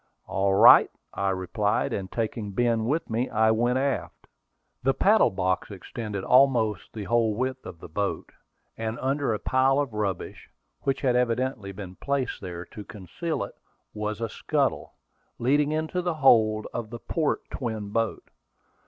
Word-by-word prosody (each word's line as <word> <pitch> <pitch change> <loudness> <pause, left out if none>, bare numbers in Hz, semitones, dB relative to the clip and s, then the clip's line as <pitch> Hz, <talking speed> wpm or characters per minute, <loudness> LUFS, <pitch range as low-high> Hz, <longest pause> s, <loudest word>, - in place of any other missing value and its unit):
"All 95 0 +1
right," - - +8 0.2
I 100 - 0
replied, 95 +3 0
and 95 -2 -4
taking 110 -3 -3
Ben 115 0 +1
with 150 +7 0
me, 115 +3 -1
I 110 0 +3
went 120 +3 +2
aft. 135 0 -2 0.6
The 135 +1 +1
paddle 210 +9 +4
box 95 -1 -1
extended 105 0 -6
almost 120 -7 +3
the 110 - -5
whole 115 0 +1
width 130 +2 -3
of 85 - -9
the - - -10
boat; 100 +5 -3 0.4
and 110 +1 -3
under 135 0 0
a 110 - 0
pile 130 +4 +2
of 140 -6 -2
rubbish, 105 -4 -4 0.3
which 135 - -1
had 125 -3 +2
evidently 125 -4 0
been 95 -2 -9
placed 140 -2 -2
there 90 -2 -6
to 105 - -10
conceal 105 - -4
it, - - -8 0.4
was 105 +1 -4
a 115 - 0
scuttle, - - -1 0.4
leading 145 +4 +2
into 155 +3 -1
the 175 -2 -1
hold 110 -7 +4
of 110 -2 -4
the 120 - -6
port 155 +5 -2
twin 110 -5 -4
boat. 115 0 -1
115 Hz, 160 wpm, -26 LUFS, 105-130 Hz, 0.6 s, right